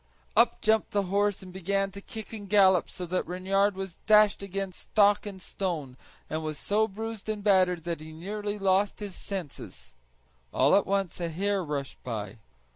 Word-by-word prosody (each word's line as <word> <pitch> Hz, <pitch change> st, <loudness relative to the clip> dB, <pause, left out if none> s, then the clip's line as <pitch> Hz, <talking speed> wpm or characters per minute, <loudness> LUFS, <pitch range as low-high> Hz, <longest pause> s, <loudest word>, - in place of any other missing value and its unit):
Up 235 Hz, +3 st, +4 dB
jumped 220 Hz, 0 st, +2 dB
the 200 Hz, -1 st, +2 dB
horse 205 Hz, -1 st, +1 dB
and 185 Hz, -1 st, -11 dB
began 195 Hz, +1 st, -1 dB
to 200 Hz, +1 st, -9 dB
kick 225 Hz, -1 st, -9 dB
and 205 Hz, -3 st, -8 dB
gallop 190 Hz, -3 st, +5 dB
so 180 Hz, -, -6 dB
that 180 Hz, -1 st, -2 dB
Reynard 195 Hz, +3 st, +1 dB
was 190 Hz, -2 st, -6 dB
dashed 210 Hz, -2 st, +6 dB
against 195 Hz, -1 st, -4 dB
stock 205 Hz, 0 st, +4 dB
and 195 Hz, -2 st, -7 dB
stone, 165 Hz, -9 st, -4 dB, 0.3 s
and 155 Hz, +1 st, -3 dB
was 155 Hz, -1 st, -4 dB
so 215 Hz, +8 st, +1 dB
bruised 220 Hz, +1 st, -6 dB
and 210 Hz, -1 st, -3 dB
battered 185 Hz, -4 st, +3 dB
that 170 Hz, -2 st, -3 dB
he 155 Hz, 0 st, -9 dB
nearly 205 Hz, +5 st, -4 dB
lost 195 Hz, 0 st, +2 dB
his 205 Hz, -2 st, -5 dB
senses. 175 Hz, -, -7 dB, 0.6 s
All 135 Hz, +7 st, +4 dB
at 200 Hz, -, +3 dB
once 195 Hz, -2 st, -1 dB
a 170 Hz, -1 st, -2 dB
hare 195 Hz, +4 st, 0 dB
rushed 145 Hz, -3 st, -4 dB
by. 105 Hz, -3 st, -5 dB
195 Hz, 180 wpm, -28 LUFS, 175-205 Hz, 0.6 s, dashed